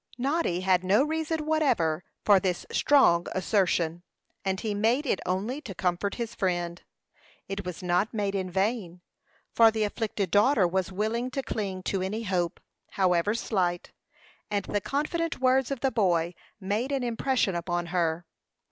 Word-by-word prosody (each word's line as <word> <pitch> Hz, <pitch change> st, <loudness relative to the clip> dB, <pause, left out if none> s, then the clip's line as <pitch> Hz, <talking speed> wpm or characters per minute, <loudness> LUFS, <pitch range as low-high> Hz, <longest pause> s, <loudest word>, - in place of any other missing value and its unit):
Noddy 265 Hz, -, 0 dB
had 185 Hz, -1 st, +2 dB
no 200 Hz, +7 st, +4 dB
reason 320 Hz, 0 st, -2 dB
whatever 225 Hz, -, +1 dB, 0.2 s
for 200 Hz, -2 st, +6 dB
this 180 Hz, -1 st, -2 dB
strong 175 Hz, -12 st, +4 dB
assertion, 175 Hz, -3 st, +1 dB, 0.4 s
and 190 Hz, -1 st, -1 dB
he 215 Hz, 0 st, -2 dB
made 230 Hz, +8 st, +1 dB
it 200 Hz, -, 0 dB
only 210 Hz, +10 st, -2 dB
to 205 Hz, -10 st, -8 dB
comfort 180 Hz, +3 st, -1 dB
his 235 Hz, -1 st, -4 dB
friend. 175 Hz, -3 st, -2 dB, 0.7 s
It 195 Hz, 0 st, -4 dB
was 180 Hz, 0 st, -6 dB
not 180 Hz, +4 st, +1 dB
made 205 Hz, -3 st, -1 dB
in 190 Hz, -2 st, -2 dB
vain, 190 Hz, -2 st, -1 dB, 0.5 s
for 230 Hz, -1 st, +7 dB
the 220 Hz, -1 st, -1 dB
afflicted 205 Hz, -3 st, -2 dB
daughter 205 Hz, -1 st, +4 dB
was 190 Hz, +2 st, -1 dB
willing 220 Hz, +6 st, -1 dB
to 270 Hz, +1 st, -3 dB
cling 195 Hz, -6 st, -4 dB
to 195 Hz, 0 st, -1 dB
any 210 Hz, +5 st, -3 dB
hope, 180 Hz, -4 st, -1 dB, 0.3 s
however 185 Hz, +2 st, +2 dB
slight, 180 Hz, -6 st, -1 dB, 0.6 s
and 205 Hz, -2 st, -1 dB
the 205 Hz, -, -1 dB
confident 320 Hz, -, -2 dB
words 260 Hz, 0 st, +3 dB
of 275 Hz, -3 st, -3 dB
the 270 Hz, -, +1 dB
boy 175 Hz, -7 st, +1 dB, 0.3 s
made 210 Hz, +7 st, -2 dB
an 275 Hz, -2 st, 0 dB
impression 240 Hz, -3 st, 0 dB
upon 175 Hz, 0 st, -2 dB
her. 170 Hz, -1 st, 0 dB
200 Hz, 155 wpm, -27 LUFS, 180-240 Hz, 0.7 s, for